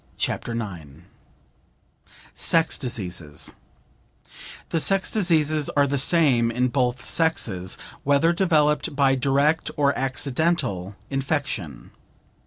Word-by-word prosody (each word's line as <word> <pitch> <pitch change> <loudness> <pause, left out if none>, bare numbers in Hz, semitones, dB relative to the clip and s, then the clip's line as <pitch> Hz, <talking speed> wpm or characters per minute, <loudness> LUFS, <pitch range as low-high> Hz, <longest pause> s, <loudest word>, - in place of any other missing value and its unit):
CHAPTER 115 - -2
IX 85 -9 -7 1.3
SEX 165 -1 +2
DISEASES 90 - -5 1.2
The 165 - 0
sex 195 +4 +1
diseases 155 -7 +2
are 145 - +5
the 140 0 -1
same 135 -6 +3
in 125 +2 0
both 125 -1 -1
sexes, 110 - 0 0.3
whether 145 +4 +3
developed 150 -5 +1
by 140 -1 +3
direct 140 +4 +1
or 140 -1 +2
accidental 130 - -1 0.2
infection. 135 - -3
135 Hz, 95 wpm, -24 LUFS, 115-155 Hz, 1.3 s, are